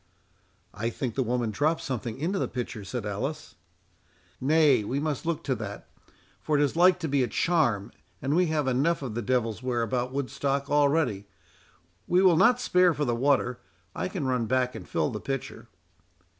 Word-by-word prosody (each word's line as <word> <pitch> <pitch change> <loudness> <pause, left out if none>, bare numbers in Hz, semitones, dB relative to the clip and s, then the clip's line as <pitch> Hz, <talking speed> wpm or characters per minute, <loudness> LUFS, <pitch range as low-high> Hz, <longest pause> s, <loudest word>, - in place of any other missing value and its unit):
"I 115 +3 -2
think 120 0 -4
the 135 - -1
woman 120 -2 -1
dropped 155 +9 0
something 120 -3 -4
into 180 +7 -1
the - - 0
pitcher," 120 -4 -5
said 110 +3 -5
Alice. 135 +10 -4 0.9
"Nay, 145 -4 +4
we 130 +7 -2
must 150 0 -3
look 170 -2 -1
to 135 - 0
that, 105 -4 -7 0.5
for 150 - +1
it 145 - +3
is 145 - 0
like 180 +2 +5
to 160 - -1
be 140 -2 +1
a 125 - +1
charm, 120 - +1 0.3
and 135 +4 -1
we 180 0 +3
have 155 -3 0
enough 140 +5 +1
of 125 -5 -4
the 120 - -2
devil's 115 -1 -1
ware 125 -2 -1
about 125 +2 -1
Woodstock 140 +1 -2
already—we 100 - -1
will 185 -3 +5
not 240 +9 +5
spare 180 -6 +3
for 150 +1 -1
the 120 - 0
water—I 115 -10 -1
can 185 -6 -4
run 125 -3 0
back 130 +1 +1
and - - -9
fill - - 0
the 105 - -5
pitcher." 135 -2 -5
130 Hz, 180 wpm, -27 LUFS, 115-150 Hz, 0.9 s, like